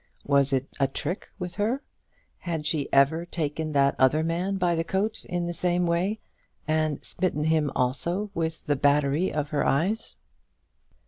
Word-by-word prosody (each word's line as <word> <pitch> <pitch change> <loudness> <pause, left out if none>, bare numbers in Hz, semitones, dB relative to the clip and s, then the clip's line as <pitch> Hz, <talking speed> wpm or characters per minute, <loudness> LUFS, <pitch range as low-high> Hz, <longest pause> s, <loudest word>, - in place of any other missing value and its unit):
Was 140 -1 +3
it 135 0 0
a 135 - +4
trick 155 +7 -4
with 180 -3 -5
her? 230 +7 0 0.6
Had 165 -4 -3
she 150 -3 -1
ever 140 +5 +4
taken 160 -2 -3
that 140 -1 +4
other 140 +4 +4
man 175 +4 -1
by 180 -2 +2
the 165 0 0
coat 195 +5 -1
in 175 -1 -2
the 175 - -3
same 175 +1 +1
way, 180 +6 0 0.5
and 155 -2 0
smitten 175 -4 -1
him 155 -2 +2
also 170 +11 -1
with 160 -2 -3
the 145 - +2
battery 145 +4 +2
of 150 -1 -2
her 150 -3 0
eyes? 185 +11 +1
160 Hz, 160 wpm, -26 LUFS, 145-180 Hz, 0.6 s, a